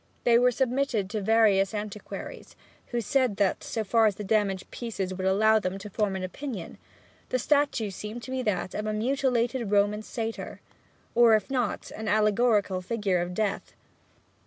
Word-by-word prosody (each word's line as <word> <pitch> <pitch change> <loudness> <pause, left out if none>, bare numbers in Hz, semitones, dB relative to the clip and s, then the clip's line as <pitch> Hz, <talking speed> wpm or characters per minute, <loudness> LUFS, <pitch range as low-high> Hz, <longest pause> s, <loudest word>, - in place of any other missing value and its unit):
They 235 -1 +5
were 250 +1 +5
submitted 250 -5 0
to 215 -2 -2
various 210 -1 +3
antiquaries, 210 0 -7 0.3
who 240 -1 -2
said 255 -1 +1
that, 200 -2 +1
so 220 - -3
far 225 +2 +3
as 205 - 0
the 210 - -6
damaged 200 -2 0
pieces 200 -6 -4
would 185 0 -2
allow 220 +3 +4
them 185 -1 -3
to 200 +1 -9
form 205 -1 0
an 190 - -4
opinion, 205 -1 -6 0.5
the 255 - +1
statue 280 -5 +1
seemed 215 +5 -7
to 260 - -7
be 260 0 -1
that 195 -5 -1
of 210 0 -3
a 215 - -1
mutilated 245 0 0
Roman 205 +1 +2
satyr; 225 +1 -5 0.5
or 235 -2 +6
if 215 +5 -2
not, 245 -5 -2
an 220 0 -6
allegorical 210 -2 +2
figure 195 -2 0
of 175 +1 -4
Death. 210 -1 -2
215 Hz, 170 wpm, -27 LUFS, 200-235 Hz, 0.5 s, or